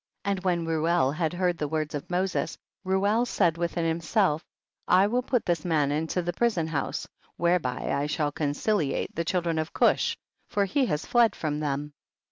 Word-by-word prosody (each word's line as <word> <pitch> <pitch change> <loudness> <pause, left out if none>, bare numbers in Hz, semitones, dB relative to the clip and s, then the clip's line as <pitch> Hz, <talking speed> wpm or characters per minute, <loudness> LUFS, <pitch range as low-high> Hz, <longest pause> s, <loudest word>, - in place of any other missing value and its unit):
And 200 -2 -1
when 175 -3 +1
Reuel 165 -2 +2
had 160 +1 -1
heard 175 -1 0
the 150 - -1
words 155 0 -2
of 145 - -5
Moses, 180 +1 -1 0.3
Reuel 200 +4 +2
said 180 -8 +2
within 170 0 -1
himself, 165 0 +1 0.4
I 185 +2 +5
will 240 +5 +1
put 250 -1 0
this 170 -3 0
man 150 -5 +1
into 160 +4 -1
the 175 +1 -2
prison 220 -9 +1
house, 160 -3 -3 0.3
whereby 170 -8 0
I 140 +1 0
shall 150 -1 0
conciliate 150 +2 -1
the 165 - -1
children 170 -2 0
of 155 +1 -3
Cush, - - +2 0.3
for 200 -1 +1
he 260 +7 +1
has 150 - -1
fled 235 -3 +3
from 150 -2 -2
them. 145 0 -2
170 Hz, 175 wpm, -27 LUFS, 150-190 Hz, 0.4 s, I